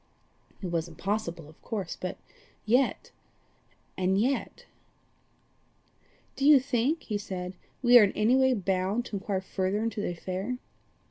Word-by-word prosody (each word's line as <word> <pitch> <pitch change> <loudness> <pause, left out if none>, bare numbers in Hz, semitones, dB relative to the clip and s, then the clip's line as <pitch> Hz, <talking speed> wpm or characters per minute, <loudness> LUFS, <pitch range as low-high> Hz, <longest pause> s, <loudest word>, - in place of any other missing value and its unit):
It 180 - -3
was 165 -1 -1
impossible 175 -1 -3
of 155 - -18
course 200 -6 -4
but 185 0 -5 0.5
yet 250 +5 +1 0.8
and 190 +1 +1
yet 260 +5 -1 1.7
"Do - - -4
you 290 -1 +8
think," 270 +4 0
he 210 -2 -3
said, 185 -2 -5 0.3
"we 245 0 +9
are - - +7
in 200 - +3
any 220 +4 +3
way 260 -1 +4
bound 195 +3 0
to 210 - -4
inquire 190 -1 -2
further 190 +2 -1
into 225 -2 -2
the - - -1
affair?" 185 +7 -4
205 Hz, 140 wpm, -28 LUFS, 185-240 Hz, 1.7 s, we